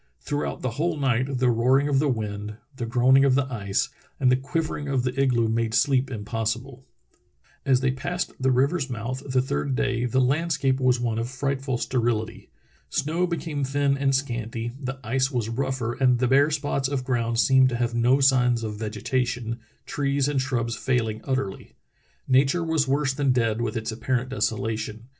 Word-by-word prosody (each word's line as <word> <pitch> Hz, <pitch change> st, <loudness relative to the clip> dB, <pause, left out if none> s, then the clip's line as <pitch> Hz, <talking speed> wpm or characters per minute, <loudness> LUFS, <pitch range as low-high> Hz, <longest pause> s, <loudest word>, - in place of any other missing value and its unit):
Throughout 145 Hz, 0 st, -3 dB
the 130 Hz, -, -1 dB
whole 170 Hz, -1 st, 0 dB
night 130 Hz, -1 st, 0 dB
the 125 Hz, -1 st, +3 dB
roaring 130 Hz, +5 st, +3 dB
of 140 Hz, -2 st, +2 dB
the 145 Hz, 0 st, +2 dB
wind, 105 Hz, -3 st, -3 dB, 0.2 s
the 120 Hz, -3 st, -4 dB
groaning 130 Hz, +3 st, +4 dB
of 135 Hz, -2 st, +4 dB
the 140 Hz, 0 st, +2 dB
ice, 105 Hz, +4 st, -1 dB, 0.3 s
and 130 Hz, -2 st, +4 dB
the -, -, +5 dB
quivering 145 Hz, +2 st, -3 dB
of 135 Hz, -3 st, 0 dB
the 125 Hz, -1 st, -1 dB
igloo 120 Hz, -4 st, +2 dB
made 115 Hz, 0 st, 0 dB
sleep 135 Hz, 0 st, +2 dB
impossible. 115 Hz, +3 st, -4 dB, 0.8 s
As 130 Hz, -1 st, +4 dB
they 130 Hz, -1 st, +2 dB
passed 175 Hz, +7 st, -3 dB
the 130 Hz, 0 st, +1 dB
river's 135 Hz, +3 st, +1 dB
mouth 125 Hz, +2 st, -4 dB
the 130 Hz, -1 st, +2 dB
third 130 Hz, 0 st, -2 dB
day 125 Hz, -2 st, 0 dB
the 130 Hz, +2 st, +1 dB
landscape 140 Hz, 0 st, +1 dB
was 130 Hz, -1 st, +2 dB
one 115 Hz, -2 st, -1 dB
of 115 Hz, +1 st, -3 dB
frightful 135 Hz, 0 st, -2 dB
sterility. 115 Hz, -3 st, -2 dB, 0.4 s
Snow 165 Hz, +5 st, 0 dB
became 160 Hz, -4 st, -3 dB
thin 140 Hz, +1 st, +1 dB
and 135 Hz, -1 st, +1 dB
scanty, 120 Hz, -3 st, -3 dB
the 135 Hz, 0 st, -4 dB
ice 130 Hz, +3 st, +1 dB
was 120 Hz, -5 st, -2 dB
rougher, 130 Hz, -1 st, -2 dB
and 125 Hz, -1 st, +3 dB
the 125 Hz, +1 st, +1 dB
bare 140 Hz, +4 st, +4 dB
spots 145 Hz, -3 st, -1 dB
of 135 Hz, -2 st, -2 dB
ground 115 Hz, -3 st, 0 dB
seemed 130 Hz, 0 st, +5 dB
to 125 Hz, -, -3 dB
have 120 Hz, 0 st, -1 dB
no 120 Hz, +3 st, +3 dB
signs 125 Hz, -4 st, +3 dB
of 105 Hz, -1 st, -4 dB
vegetation, 120 Hz, +2 st, -2 dB, 0.3 s
trees 140 Hz, -1 st, 0 dB
and 145 Hz, -2 st, 0 dB
shrubs 120 Hz, -4 st, -1 dB
failing 110 Hz, -3 st, -1 dB
utterl}^. 130 Hz, -7 st, -3 dB, 0.5 s
Nature 135 Hz, +6 st, +3 dB
was 160 Hz, -3 st, +1 dB
worse 140 Hz, 0 st, +1 dB
than 140 Hz, -1 st, +1 dB
dead 115 Hz, -2 st, +1 dB
with 115 Hz, -1 st, -2 dB
its 110 Hz, +1 st, -3 dB
apparent 125 Hz, +3 st, -2 dB
desolation. 110 Hz, -2 st, -2 dB
130 Hz, 180 wpm, -25 LUFS, 115-135 Hz, 0.8 s, the